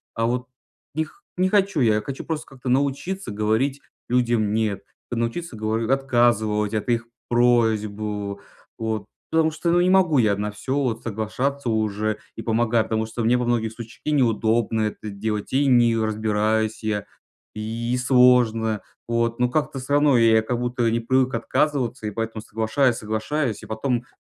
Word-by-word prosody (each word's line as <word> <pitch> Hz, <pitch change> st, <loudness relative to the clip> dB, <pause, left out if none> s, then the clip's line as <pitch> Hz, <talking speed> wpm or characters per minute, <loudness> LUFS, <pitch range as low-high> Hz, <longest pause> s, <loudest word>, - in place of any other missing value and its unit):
А 115 Hz, -, 0 dB
вот 125 Hz, +2 st, -1 dB, 0.5 s
не 160 Hz, -, +1 dB
х 155 Hz, -, -14 dB, 0.2 s
не 185 Hz, +1 st, +2 dB
хочу 195 Hz, -4 st, +2 dB
я, 115 Hz, -5 st, +4 dB
я 105 Hz, -, 0 dB
хочу 135 Hz, +4 st, -6 dB
просто 160 Hz, -2 st, -3 dB
как-то 130 Hz, -1 st, -7 dB
научиться 140 Hz, -, -1 dB
говорить 110 Hz, +7 st, 0 dB, 0.3 s
людям 120 Hz, -4 st, +2 dB
"нет", 105 Hz, -3 st, -1 dB, 0.3 s
т 120 Hz, -, -3 dB
научиться, 115 Hz, +5 st, -3 dB
говорю, 110 Hz, +1 st, -1 dB
отказывать 120 Hz, -5 st, +2 dB
от 110 Hz, +2 st, -2 dB
их 115 Hz, -1 st, +1 dB, 0.2 s
просьб, 120 Hz, -3 st, +3 dB
э. 105 Hz, -2 st, -3 dB, 0.4 s
Вот, 110 Hz, -2 st, -2 dB, 0.3 s
потому 160 Hz, 0 st, +3 dB
что 165 Hz, +2 st, -1 dB
ну 175 Hz, -, +4 dB
не 180 Hz, -, +3 dB
могу 185 Hz, -5 st, +4 dB
я 105 Hz, -3 st, +3 dB
на 105 Hz, +1 st, -3 dB
всё 105 Hz, +6 st, -4 dB
вот 125 Hz, -6 st, -1 dB
соглашаться 120 Hz, +5 st, -2 dB
уже 110 Hz, -1 st, 0 dB, 0.2 s
и -, -, -6 dB
помогать, 115 Hz, 0 st, +2 dB
потому 110 Hz, 0 st, 0 dB
что 115 Hz, +1 st, -4 dB
мне 120 Hz, +2 st, +3 dB
во 125 Hz, -, -1 dB
многих 115 Hz, -2 st, 0 dB
случ 115 Hz, 0 st, -11 dB
и 150 Hz, -, -1 dB
неудобно 115 Hz, -4 st, +2 dB
это 105 Hz, 0 st, -3 dB
делать, 105 Hz, +2 st, -4 dB
и 140 Hz, +2 st, +3 dB
не 120 Hz, -3 st, +4 dB
разбираюсь 110 Hz, 0 st, 0 dB
я, 105 Hz, -2 st, -1 dB, 0.5 s
и 115 Hz, +3 st, -2 dB
сложно. 125 Hz, -4 st, +4 dB, 0.3 s
Вот. 115 Hz, 0 st, 0 dB
Но 125 Hz, 0 st, +2 dB
как-то 145 Hz, -1 st, -1 dB
всё 130 Hz, +3 st, -4 dB
равно 145 Hz, -2 st, +5 dB
я 115 Hz, -1 st, +5 dB
как 120 Hz, +2 st, -2 dB
будто 120 Hz, -1 st, 0 dB
не 115 Hz, -, +1 dB
привык 130 Hz, +2 st, +1 dB
отказываться, 125 Hz, 0 st, 0 dB
и -, -, -3 dB
поэтому 115 Hz, +1 st, -4 dB
соглашаюсь, 115 Hz, +3 st, +1 dB
соглашаюсь, 110 Hz, +3 st, -2 dB
и -, -, -8 dB
потом, 120 Hz, +2 st, -1 dB
в -, -, -28 dB
115 Hz, 175 wpm, -23 LUFS, 110-130 Hz, 0.5 s, равно